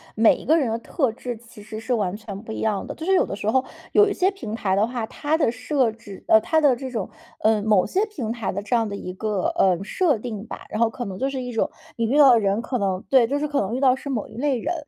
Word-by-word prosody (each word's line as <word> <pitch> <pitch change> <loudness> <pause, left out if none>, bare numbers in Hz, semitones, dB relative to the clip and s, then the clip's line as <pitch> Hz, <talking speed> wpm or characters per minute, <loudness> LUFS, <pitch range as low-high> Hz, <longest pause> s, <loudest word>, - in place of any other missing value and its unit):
每 220 0 +5
一 - - -11
个 320 +3 +4
人 265 -7 +1
的 230 - -2
特 255 0 -1
质 240 0 -6
其 230 -2 -15
实 215 +1 -7
是 245 +3 -2
完 200 -5 0
全 205 -2 -8
不 220 - -9
一 - - -5
样 210 -3 0
的。 - - -6
就 320 - -7
是 385 - +2
有 375 - +4
的 - - -5
时 205 +1 -2
候 260 +1 +3 0.3
有 420 0 +5
一 - - -1
些 380 +1 +2
平 225 - -6
台 190 -4 0
的 210 +3 +2
话， 240 -2 -3
它 305 +2 -1
的 290 -8 +2
设 250 0 0
置， 210 -3 -12
呃 220 - +7
它 315 +7 +2
的 280 -4 +5
这 260 +2 -6
种， 225 -6 -4 0.3
呃 215 -1 +3
某 210 -4 +3
些 395 +3 +1
平 250 - -4
台 230 -4 -3
的 200 - -4
这 225 +4 0
样 225 -2 +2
的 200 - -4
一 180 -2 -6
个， 205 0 -1
呃， 185 -1 +3
设 305 - +1
定 215 -1 -6
吧 - - -8
然 215 - -4
后 230 - +4
可 240 +2 -6
能 190 -1 -6
就 270 - 0
是 270 -1 -4
一 250 0 -5
种 225 - 0 0.3
你 230 - +1
遇 255 +6 +1
到 280 -3 +8
的 235 - +6
人， 200 +1 +1
可 250 - -2
能 190 -4 -1
对， 255 -4 +5
就 280 +4 0
是 300 +1 -1
可 285 -5 0
能 205 +4 -2
遇 - - -1
到 260 -2 +4
是 280 - -8
某 230 -6 -2
一 - - -14
类 275 -1 +1
人， 350 - -2
230 Hz, 325 characters per minute, -23 LUFS, 210-270 Hz, 0.3 s, 到